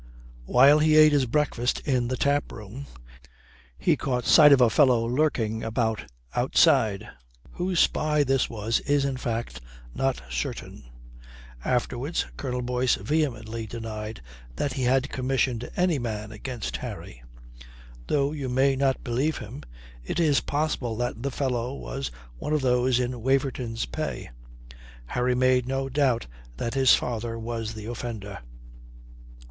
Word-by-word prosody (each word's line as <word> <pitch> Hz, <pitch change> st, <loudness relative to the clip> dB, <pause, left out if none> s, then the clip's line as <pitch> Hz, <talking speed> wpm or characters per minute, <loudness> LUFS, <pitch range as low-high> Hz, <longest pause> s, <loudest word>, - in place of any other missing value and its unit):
While 140 Hz, +4 st, +6 dB
he 155 Hz, 0 st, +4 dB
ate 155 Hz, 0 st, +8 dB
his 140 Hz, -3 st, +2 dB
breakfast 125 Hz, -2 st, 0 dB
in 130 Hz, -5 st, 0 dB
the 130 Hz, +1 st, -2 dB
taproom, 140 Hz, -3 st, -2 dB, 0.9 s
he -, -, +2 dB
caught 125 Hz, -2 st, -2 dB
sight 150 Hz, -2 st, +8 dB
of 140 Hz, -, +7 dB
a 120 Hz, -3 st, +5 dB
fellow 125 Hz, -5 st, +4 dB
lurking 120 Hz, -4 st, 0 dB
about 110 Hz, -1 st, -1 dB, 0.3 s
outside. 105 Hz, -1 st, +3 dB, 0.4 s
Whose 180 Hz, -1 st, -1 dB
spy 150 Hz, -1 st, +2 dB
this 135 Hz, -1 st, +1 dB
was 110 Hz, 0 st, -1 dB
is, 145 Hz, -1 st, +1 dB
in 135 Hz, -1 st, -1 dB
fact, 115 Hz, -, -4 dB, 0.3 s
not 135 Hz, -1 st, 0 dB
certain. -, -, -5 dB, 0.8 s
Afterwards 125 Hz, +5 st, -1 dB
Colonel 125 Hz, -2 st, -3 dB
Boyce 125 Hz, 0 st, +1 dB
vehemently 115 Hz, -7 st, -2 dB
denied 110 Hz, -, -6 dB, 0.3 s
that 140 Hz, -, -2 dB
he 130 Hz, -, -3 dB
had 130 Hz, +2 st, +2 dB
commissioned 130 Hz, -2 st, -1 dB
any 180 Hz, -5 st, +2 dB
man 110 Hz, -3 st, -4 dB
against 110 Hz, -, -5 dB
Harry. -, -, -8 dB, 0.9 s
Though 140 Hz, -1 st, +1 dB
you 140 Hz, -4 st, -4 dB
may 135 Hz, +2 st, +3 dB
not 135 Hz, 0 st, 0 dB
believe 130 Hz, +6 st, 0 dB
him, 120 Hz, +7 st, -8 dB, 0.4 s
it 65 Hz, -, -3 dB
is 150 Hz, -5 st, +3 dB
possible 145 Hz, -6 st, -2 dB
that 120 Hz, -1 st, -3 dB
the 140 Hz, -, -1 dB
fellow 130 Hz, -2 st, -2 dB
was 135 Hz, -1 st, -5 dB, 0.3 s
one 150 Hz, -, -2 dB
of 150 Hz, -, +2 dB
those 125 Hz, -1 st, +2 dB
in 125 Hz, -1 st, -2 dB
Waverton's 130 Hz, -3 st, 0 dB
pay. -, -, -5 dB, 0.7 s
Harry 125 Hz, -, 0 dB
made 130 Hz, 0 st, +3 dB
no 135 Hz, 0 st, -2 dB
doubt 130 Hz, -3 st, +1 dB, 0.3 s
that 115 Hz, -, -3 dB
his 135 Hz, -1 st, +6 dB
father 115 Hz, -1 st, -3 dB
was 115 Hz, -1 st, -4 dB
the 110 Hz, -1 st, -8 dB
offender. 110 Hz, -4 st, -6 dB
125 Hz, 140 wpm, -26 LUFS, 115-140 Hz, 0.9 s, ate